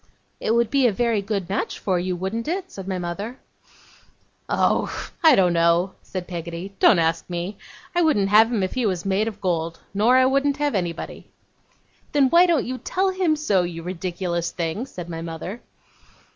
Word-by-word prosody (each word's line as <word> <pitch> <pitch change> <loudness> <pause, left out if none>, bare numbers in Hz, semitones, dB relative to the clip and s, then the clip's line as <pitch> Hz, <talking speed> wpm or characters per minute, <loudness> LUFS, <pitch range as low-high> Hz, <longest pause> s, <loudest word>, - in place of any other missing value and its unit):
'It - - -3
would 235 -2 +2
be 275 -3 +4
a - - +2
very 230 0 +1
good 200 -3 -3
match 195 - -2
for 185 -3 0
you; 180 +1 -2
wouldn't 190 +7 -3
it?' 370 +3 -3
said 195 -1 -8
my 190 -1 -2
mother. 195 +8 -5 1.1
'Oh! - - +2 0.4
I 315 -4 +8
don't 180 -2 +3
know,' 170 +2 +2
said 185 -2 -6
Peggotty. 170 +2 -6
'Don't 205 - +6
ask 165 +1 0
me. 175 +3 -4 0.3
I 350 - +2
wouldn't 245 - +2
have 220 +3 +6
him 215 -5 0
if 185 - -2
he 250 -4 0
was 185 -2 -2
made 195 +3 +1
of 220 - -5
gold. 165 -3 -2
Nor 225 +6 +4
I 260 - +5
wouldn't 275 +2 +2
have 290 -2 0
anybody.' 175 -4 -4 0.8
'Then, 275 -3 +4
why 350 +2 +6
don't 330 -6 +2
you 255 +1 -4
tell 380 +1 0
him 370 -4 +1
so, 210 -12 +2
you 170 -1 -5
ridiculous 175 -1 -3
thing?' 175 +9 -3
said 180 -9 -8
my 165 -1 -5
mother. 170 +7 -6
195 Hz, 185 wpm, -23 LUFS, 175-250 Hz, 1.1 s, I